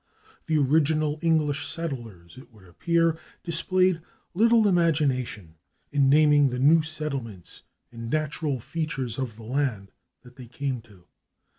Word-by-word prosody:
The 160 -1 +2
original 150 +1 +2
English 155 -3 +1
settlers, 120 - -6
it 130 0 -14
would 105 -4 -19
appear, 165 - +1 0.2
displayed 185 +1 +1 0.3
little 225 +3 +4
imagination 140 - 0 0.3
in 140 -2 +3
naming 145 -1 +5
the 125 - -4
new 150 +6 +5
settlements 140 - -6 0.3
and 115 -1 -7
natural 150 -1 -1
features 135 -3 -4
[Pg287] - - -2
of 120 -5 -4
the 115 - -12
land 120 -5 -2 0.3
that 125 +1 -17
they 125 -2 -10
came 130 0 -4
to. 100 -6 -20
145 Hz, 135 wpm, -26 LUFS, 120-160 Hz, 0.3 s, naming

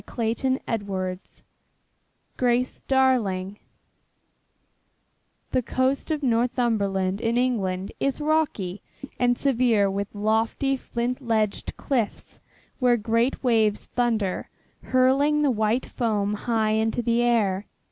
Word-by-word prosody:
CHAPTER 240 +3 -1
XXIV 190 -4 -4 0.9
GRACE 250 0 0
DARLING 215 -8 +1 1.9
The 255 - +2
coast 260 +5 -1
of 305 -2 -1
Northumberland 225 -6 0
in 230 0 0
England 195 -7 -1
is 275 +1 -1
rocky 295 - 0 0.4
and 245 -1 +2
severe 235 -7 +2
with 200 +1 -4
lofty 220 +6 +1
flint 250 0 -3
ledged 220 -4 -1
cliffs 240 -7 -3 0.4
where 245 -2 +4
great 230 +5 0
waves 220 -4 +2
thunder, 225 -6 -1 0.4
hurling 275 +4 +3
the 285 - +3
white 220 +2 0
foam 210 -4 -1
high 220 0 0
into 220 +2 0
the 235 +1 +2
air. 210 -5 +1
230 Hz, 105 wpm, -25 LUFS, 210-255 Hz, 1.9 s, where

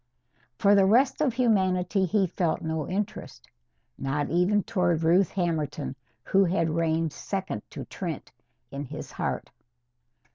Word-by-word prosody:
For 200 0 +4
the 195 -1 +5
rest 255 +8 +3
of 290 -4 +3
humanity 190 -5 +2
he 195 +2 +2
felt 175 -2 -1
no 160 -2 -2
interest. 195 +2 -4 0.5
Not 145 +2 -1
even 185 +4 +3
toward 175 -5 +1
Ruth 175 +3 +4
Hammerton, 155 -6 -2 0.3
who 195 0 +3
had 170 -2 +1
reigned 165 -1 0
second 190 - -4
to - - -7
Trent - - -6 0.4
in 140 +1 -5
his - - -8
heart. - - -3
180 Hz, 135 wpm, -27 LUFS, 160-195 Hz, 0.5 s, the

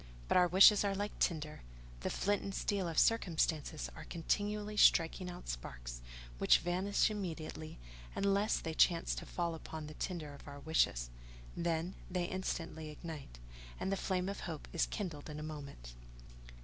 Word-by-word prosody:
But - - +2
our 180 -1 +6
wishes 195 +4 +8
are 200 -1 +1
like 205 +1 -3
tinder: 155 -3 0 0.4
the - - -2
flint 205 +1 +1
and 195 -1 -5
steel 195 -3 0
of 165 -2 -4
circumstances 160 -8 +2
are - - -9
continually 210 +5 -1
striking 180 -1 +5
out 180 0 -9
sparks, - - -6 0.4
which - - +6
vanish 185 +5 +1
immediately, 160 -5 -5 0.4
unless 200 +2 +2
they 160 - -4
chance 170 +1 +4
to - - -6
fall 170 -1 -1
upon 160 -1 -7
the 150 - -8
tinder 155 -4 -4
of 140 - -13
our 145 0 -8
wishes; - - +1 0.4
then, 170 +1 -1 0.2
they 180 -1 0
instantly 165 -4 -3
ignite, 150 - -8 0.4
and 190 - -1
the - - +2
flame 185 -1 -1
of 200 - -3
hope 160 -4 -6
is 170 - +2
kindled 165 -8 -5
in 150 0 -6
a - - -5
moment. 140 - -8
170 Hz, 160 wpm, -35 LUFS, 155-190 Hz, 0.4 s, wishes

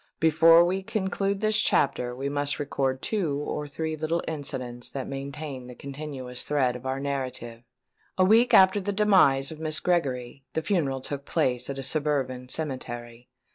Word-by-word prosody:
Before 165 +1 +6
we 185 +2 0
conclude 195 -1 -2
this 215 0 +3
chapter 125 -3 +1
we 135 +2 -3
must 145 -1 0
record 135 -2 -2
two 175 -10 -1
or 150 0 -4
three 160 +2 -3
little 155 +2 -1
incidents 125 -5 -5
that 135 -2 -5
maintain 140 -1 -6
the 125 - -10
continuous 135 -3 -6
thread 130 -4 +1
of 125 +1 -7
our 130 +1 -2
narrative. 130 -4 -4 0.6
A 185 - +5
week 225 +5 +5
after 190 +2 +6
the 205 +2 -2
demise 185 -10 +4
of 155 - -9
Miss 155 -1 0
Gregory, 135 -7 -1
the 160 - -1
funeral 145 -9 0
took 140 +1 -5
place 125 -6 0
at 140 - -4
a 135 - -3
suburban 135 -3 0
cemetery. 120 -5 -5
140 Hz, 165 wpm, -26 LUFS, 130-165 Hz, 0.6 s, Before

